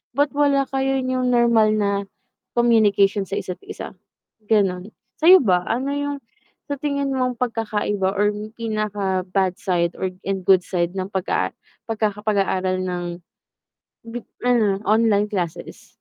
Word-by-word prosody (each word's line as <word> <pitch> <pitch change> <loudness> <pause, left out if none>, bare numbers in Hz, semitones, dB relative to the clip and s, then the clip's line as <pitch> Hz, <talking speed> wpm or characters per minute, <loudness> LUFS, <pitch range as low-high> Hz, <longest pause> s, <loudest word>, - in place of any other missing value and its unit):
but 285 +1 +2
wala 285 -1 +2
kayo 270 0 0
yung 255 0 0
normal 235 -3 +4
na 205 -1 +1 0.6
communication 205 -4 +3
sa 195 - -4
isa't 180 -1 -4
isa, - - -7 0.6
ganun. 195 -3 +1 0.3
Sa'yo 355 0 +7
ba 180 -3 +2
ano 260 +4 -1
yung 285 0 -2 0.5
sa 285 - -3
tingin 280 -2 -1
mong 255 -2 -1
pagkakaiba 210 -5 -1
or 205 +1 +2 0.2
pinaka 210 -4 -1
bad 190 -1 +1
side 170 -2 0
or 190 - -1 0.2
and 195 -1 -1
good 185 -2 +5
side 175 +1 -2
ng 185 - -1
pagka 190 -1 -1 0.3
pagkaka 215 -2 -2
pag-aaral 190 -3 +1
ng 180 -1 -3 1.0
bip 235 0 -6 0.2
ano, 215 -5 +3
online 215 -1 +3
classes. 180 -6 -5
210 Hz, 135 wpm, -22 LUFS, 190-245 Hz, 1.0 s, Sa'yo